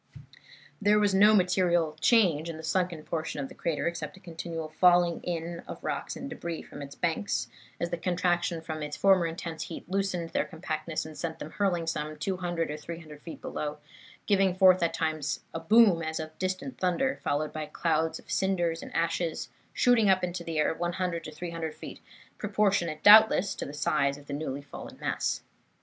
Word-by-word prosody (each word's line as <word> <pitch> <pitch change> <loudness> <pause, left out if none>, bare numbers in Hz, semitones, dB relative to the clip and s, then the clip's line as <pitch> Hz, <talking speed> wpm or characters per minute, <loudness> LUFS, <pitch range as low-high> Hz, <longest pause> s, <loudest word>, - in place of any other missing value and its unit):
There 205 +1 +4
was 205 -2 +3
no 210 +3 +7
material 175 -4 +2
change 170 -9 +4
in 165 - -5
the 160 - -9
sunken 170 0 -1
portion 160 -2 -3
of 135 -1 -4
the - - -11
crater 160 -4 -2
except 165 -2 -3
a - - -14
continual 165 -2 -6
falling 175 +1 +4
in 170 0 -4
of - - -8
rocks - - -3
and 275 - -6
debris 170 - -5
from 145 - -10
its 140 0 -8
banks 170 +4 -1 0.3
as 170 - -2
the 175 - -1
contraction 175 -1 0
from 160 -1 -5
its 150 0 -4
former 190 -3 +4
intense 165 0 -5
heat 165 - -8
loosened 185 -3 -1
their - - +1
compactness 160 -2 -4
and 155 -1 -9
sent 165 -2 -3
them 150 - -8
hurling 180 -4 0
some 155 -1 -3
200 175 -1 -2
or 150 - -4
300 155 -2 -9
feet 165 - -9
below, 150 0 -4 0.5
giving 195 -3 +3
forth 185 -1 +6
at 170 - +2
times 155 -3 -1
a 165 - -3
boom 195 0 +5
as 160 0 -3
of 155 0 -6
distant 185 +8 -3
thunder, 190 +9 +1
followed 150 +1 -1
by 155 -1 -4
clouds 160 +1 0
of - - -13
cinders 175 -1 0
and - - -9
ashes 165 0 -1 0.2
shooting 240 -5 +4
up 185 -1 +4
into 175 -1 -3
the 165 -2 -4
air 150 - +2
100 175 0 -2
to 155 - -6
300 165 0 -5
feet, - - -9 0.4
proportionate, 195 -7 +1
doubtless, 210 -2 +8
to - - -5
the - - -6
size 145 -2 +1
of 145 - -14
the 145 - -6
newly 140 -1 -4
fallen 140 - -10
mass. - - -1
170 Hz, 190 wpm, -29 LUFS, 155-185 Hz, 0.5 s, doubtless